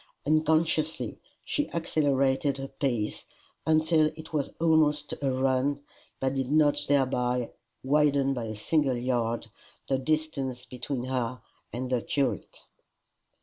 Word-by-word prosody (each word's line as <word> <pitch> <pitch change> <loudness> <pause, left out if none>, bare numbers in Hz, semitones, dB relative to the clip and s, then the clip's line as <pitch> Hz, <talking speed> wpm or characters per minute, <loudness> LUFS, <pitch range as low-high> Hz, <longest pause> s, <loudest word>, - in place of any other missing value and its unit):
Unconsciously 155 +1 +1 0.3
she 295 - -1
accelerated 140 -4 +1
her 135 0 -5
pace 120 -7 -2 0.4
until 155 0 +4
it 160 +1 -10
was 145 -3 0
almost 150 -3 +3
a 140 - +1
run, 135 +2 +1 0.4
but 135 0 0
did 135 -1 -2
not 150 -1 +4
thereby 125 -3 +1 0.3
widen 140 -1 +3
by 120 -3 -3
a 110 -1 -5
single 135 +3 +1
yard 120 -2 -1 0.4
the 135 -1 +1
distance 135 -4 -1
between 125 0 -4
her 125 -1 -2 0.3
and 125 +1 -4
the 125 -2 +2
curate. 130 - -2
135 Hz, 120 wpm, -28 LUFS, 130-155 Hz, 0.4 s, until